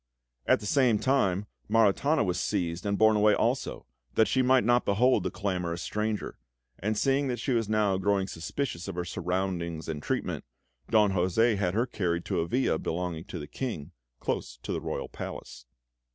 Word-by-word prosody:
At - - +5
the - - -7
same 125 -1 +3
time, 105 -6 +1 0.2
Maritana 115 +8 +3
was 90 -2 -1
seized 90 -1 -1
and 100 0 0
borne 110 0 +5
away 105 0 +5
also, - - -1 0.3
that 110 - +5
she 130 - +2
might 130 0 +4
not 120 +2 +3
behold 125 +6 +3
the - - -1
clamorous 90 -3 -2
stranger; 105 0 -3 0.4
and 105 +2 -1
seeing 135 +3 +2
that 125 -2 -1
she 125 +4 -2
was 115 -3 +1
now 105 -3 +2
growing 100 0 +1
suspicious 90 +2 -4
of 95 - -5
her 90 -1 -2
surroundings 90 -2 -2
and 75 -2 -4
treatment, - - -2 0.5
Don 105 -3 +4
José 95 +5 +2
had 95 -2 -1
her 115 +3 +2
carried 85 -8 -2
to - - -1
a 85 - 0
villa 125 -7 +1
belonging 85 -1 -3
to 100 -3 -7
the 75 - -6
King, 85 - -5 0.3
close - - -3
to - - -4
the - - -2
royal - - -3
palace. - - -8
100 Hz, 180 wpm, -28 LUFS, 90-115 Hz, 0.5 s, At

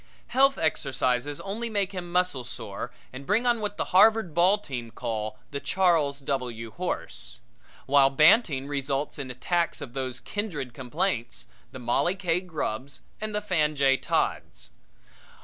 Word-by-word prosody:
Health 275 +1 +4
exercises 135 -2 0
only 220 +4 -4
make 200 -3 0
him 180 -3 -6
muscle 180 -7 +1
sore 120 -3 -6 0.2
and 130 +2 -7
bring 210 - +1
on 240 -1 +3
what 205 -1 -3
the - - -1
Harvard 215 -2 +5
ball 180 +5 +4
team 125 - -6
call 110 -1 -4
the 140 - -3
Charles 165 -6 +2
W. 125 -5 -3
Horse; 110 - -5 0.5
while 135 0 +5
banting 150 - +4
results 140 0 -2
in 135 -2 -5
attacks 170 +7 -1
of 120 - -8
those 130 -2 -3
kindred 140 - -4
complaints 120 -1 -2 0.3
the - - -8
Mollie 125 +9 +1
K. 180 -3 0
Grubbs 140 - -4 0.2
and 215 -1 -3
the 210 - 0
Fan 155 -7 +1
J. 135 -1 +4
Todds. - - -2
145 Hz, 150 wpm, -27 LUFS, 130-185 Hz, 0.5 s, Harvard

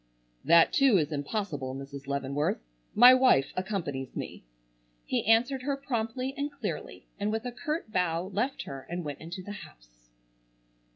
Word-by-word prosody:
"That, 170 0 +6
too, 270 -7 +5
is 155 -2 0
impossible, 145 -3 -3
Mrs. 135 0 -8
Leavenworth. 140 +1 -1 0.4
My 245 +3 +10
wife 255 - +4
accompanies 175 -9 -3
me!" - - -6 0.6
he - - 0
answered 240 +4 +3
her 280 +1 -1
promptly 255 -1 -2
and 285 +1 -3
clearly 275 -7 -6
and 205 +1 0
with 220 +2 -2
a 245 - -3
curt 305 -2 -4
bow 180 -3 0
left 245 +8 -1
her 135 -1 -8
and 175 +1 -3
went 145 -1 -6
into 175 +3 -7
the 205 - -7
house. - - -13
185 Hz, 155 wpm, -29 LUFS, -, 0.6 s, My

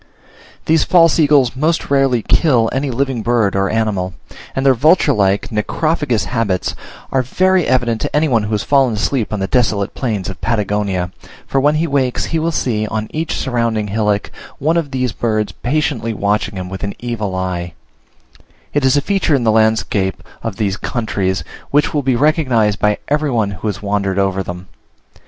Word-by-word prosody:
These 160 -1 +3
false 165 -2 +4
eagles 140 -5 +4
most 155 +2 0
rarely 135 -5 +2
kill 125 -9 +3
any 135 +2 -1
living 130 -1 -1
bird 115 -3 +1
or 100 0 +1
animal; 100 -5 -1 0.4
and 135 - -1
their 135 - +6
vulture 150 +4 +4
like, 100 -2 +1
necrophagous 125 +2 0
habits 110 -7 -1 0.4
are 135 - +2
very 185 +8 +2
evident 120 -3 +1
to - - -3
any 155 +2 +3
one 120 -5 +2
who 105 - -5
has 105 - 0
fallen 135 -5 +3
asleep 115 +2 -1
on 105 - -2
the 95 - 0
desolate 105 -3 0
plains 110 -8 -2
of 95 - -7
Patagonia, 100 -3 -1 0.3
for 135 - 0
when 145 +2 +3
he 160 +2 +1
wakes, 135 -5 0
he 165 - -1
will 165 +1 0
see, 110 -8 -1
on 110 0 -3
each 160 0 -2
surrounding 115 -5 -1
hillock, 105 0 0 0.3
one 160 +4 +1
of 165 -4 0
these 130 -3 -1
birds 110 -3 -1
patiently 120 - -1
watching 100 +1 -1
him 90 -1 -5
with 95 +2 -7
an 100 - -3
evil 110 -5 -3
eye: 90 -2 -3 1.0
it 145 - +1
is 130 +1 +4
a - - +3
feature 190 -2 +1
in 130 - 0
the 110 - +3
landscape 110 -3 +1 0.2
of 115 -4 -4
these 100 -1 -1
countries, 95 -8 -2 0.3
which 145 +1 +2
will 150 - +1
be 130 -2 +1
recognised 130 -7 +2
by 105 0 +2
every 150 +1 +1
one 110 -5 0
who 100 +3 -5
has 105 0 -4
wandered 100 -1 -1
over 95 -1 +1
them. 90 0 -7
115 Hz, 185 wpm, -17 LUFS, 105-140 Hz, 1.0 s, their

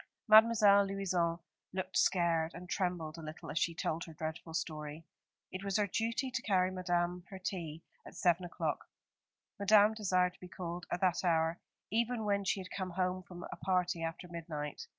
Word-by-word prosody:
Mademoiselle 215 -2 +7
Louison 180 -4 0 0.4
looked 185 0 -4
scared, 170 -3 +2
and 180 +1 -8
trembled 175 -3 -2
a - - -7
little 155 0 -7
as 160 - 0
she 170 - 0
told 165 0 -2
her 165 - -10
dreadful 160 +1 -5
story. 155 -1 -4 0.5
It 185 +1 -5
was 200 0 0
her 210 - +3
duty 230 +6 -1
to 250 -1 -2
carry 185 -4 +2
Madame 175 -1 -1
her 195 - -7
tea 170 -4 -5 0.2
at - - -12
seven 175 0 +2
o'clock. 175 - -3 0.7
Madame 210 +1 +6
desired 185 -4 +1
to - - -22
be 180 - -9
called 175 -1 -6
at 175 - -1
that 185 -2 +2
hour, 165 -1 +2 0.3
even 230 0 0
when 200 -1 +1
she 195 - 0
had 185 -1 -8
come 185 -2 -3
home 185 +1 -1
from 175 -1 -10
a - - -4
party 180 -2 0
after 165 +2 -4
midnight. 160 -4 -5
180 Hz, 180 wpm, -34 LUFS, 170-195 Hz, 0.7 s, Mademoiselle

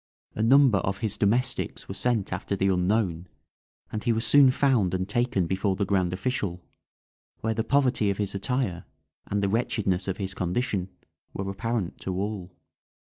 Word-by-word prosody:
A - - -3
number 125 -2 +5
of 95 +2 -2
his 105 0 -1
domestics 115 +6 0
were - - -5
sent 115 -1 0
after 100 - -2
the 95 0 +1
unknown, 90 -2 0 0.6
and 110 - -4
he 120 - +2
was 115 0 0
soon 140 -2 +7
found 125 -9 +2
and 95 0 -2
taken 120 -3 +1
before 95 +2 0
the 100 +1 0
grand 95 -3 +1
official, 95 -3 -2 0.8
where 110 0 0
the 110 0 -1
poverty 130 -6 +2
of 100 - -1
his 105 -2 -2
attire, 100 -3 -2 0.4
and 100 0 -1
the - - +2
wretchedness 100 -4 0
of 95 - -2
his 95 -2 -3
condition, 95 0 -1 0.5
were 95 - -3
apparent 115 -2 -3
to 95 - -4
all. 100 -3 -4
100 Hz, 170 wpm, -26 LUFS, 95-115 Hz, 0.8 s, soon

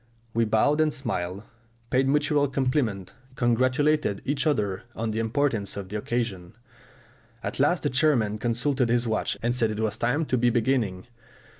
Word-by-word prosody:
We 115 0 +2
bowed 125 +8 +3
and 155 -1 +2
smiled, 100 -9 -3 0.5
paid 130 +1 +3
mutual 145 0 +2
compliments, 125 -8 -1 0.2
congratulated 130 -1 +1
each 145 +3 0
other 100 -10 0
on 115 0 -2
the 110 - -2
importance 115 -4 0
of 95 -2 -6
the 105 - -3
occasion. 105 -6 -3 0.9
At - - -4
last 155 +5 +2
the 145 - +1
chairman 125 -7 +2
consulted 125 +2 0
his 120 0 +2
watch 110 -1 -1
and 120 +1 +1
said 120 -3 +1
it 105 0 -4
was 110 -1 -1
time 145 +7 +1
to 130 -3 0
be 120 0 +3
beginning. 115 -6 0
120 Hz, 160 wpm, -26 LUFS, 110-140 Hz, 0.9 s, bowed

